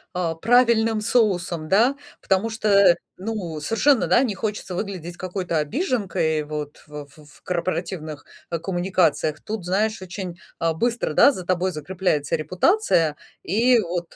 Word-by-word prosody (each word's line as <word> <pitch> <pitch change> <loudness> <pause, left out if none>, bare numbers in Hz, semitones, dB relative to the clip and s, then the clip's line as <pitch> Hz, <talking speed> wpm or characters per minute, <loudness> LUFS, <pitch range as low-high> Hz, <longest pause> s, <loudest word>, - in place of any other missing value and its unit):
э, 175 -2 -1
правильным 230 -2 +3
соусом, 180 -8 0
да. 230 +9 +4 0.2
Потому 195 +4 0
что, 200 -4 +4 0.2
ну, 185 -6 -4
совершенно, 230 - +2
да, 240 - +4
не 235 -6 -1
хочется 205 -2 -4
выглядеть 175 -3 -5
какой-то 185 -2 -3
обиженкой, 185 - -1
вот, 150 -1 -6
в, 150 0 -8
ф 140 +2 -20
ф 150 -1 -18
корпоративных, 170 -4 -3 0.2
э, 170 - -1
коммуникациях. 175 -4 0
Тут, 215 -4 -5
знаешь, 210 +4 0
очень, 180 -1 -7 0.2
а, 165 0 0
быстро, 235 +8 -1
да, 285 - +6
за 185 -8 -7
тобой 185 +1 +1
закрепляется 160 -2 -1
репутация. 165 - +2 0.3
И 235 +6 +3
вот, 175 -1 -5
185 Hz, 140 wpm, -23 LUFS, 165-220 Hz, 0.3 s, да